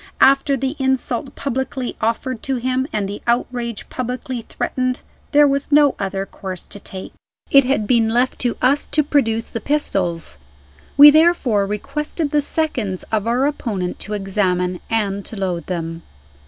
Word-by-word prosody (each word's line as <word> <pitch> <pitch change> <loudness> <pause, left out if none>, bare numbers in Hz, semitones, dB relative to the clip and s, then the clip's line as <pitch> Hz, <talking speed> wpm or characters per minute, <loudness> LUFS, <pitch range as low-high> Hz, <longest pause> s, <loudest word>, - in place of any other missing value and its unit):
After 275 +1 +4
the 270 +3 -2
insult 265 -1 -1
publicly 265 -1 -3
offered 230 +1 -1
to 270 - -2
him, 255 +2 -1
and 205 -2 -1
the 200 +1 -6
outrage 235 -1 -1
publicly 250 0 -4
threatened, 255 +2 -2 0.3
there 295 -1 +6
was 280 +1 -1
no 290 -1 +6
other 195 0 -2
course 190 -2 -7
to 205 - -11
take. 190 -1 -8 0.4
It 275 -1 +7
had 255 -5 +1
been 225 0 +3
left 245 +3 +1
to 245 -2 -1
us 275 +3 +3
to 305 - +2
produce 230 -6 0
the 230 - -4
pistols. 180 - -1 0.6
We 295 +1 +11
therefore 290 - +3
requested 295 - -3
the 295 - +3
seconds 255 - -1
of 220 0 0
our 245 +3 +2
opponent 210 -11 -2
to 210 - -4
examine 185 -3 0
and 200 -3 -1
to - - -6
load 180 -4 -2
them. 165 -2 -4
240 Hz, 155 wpm, -20 LUFS, 200-275 Hz, 0.6 s, We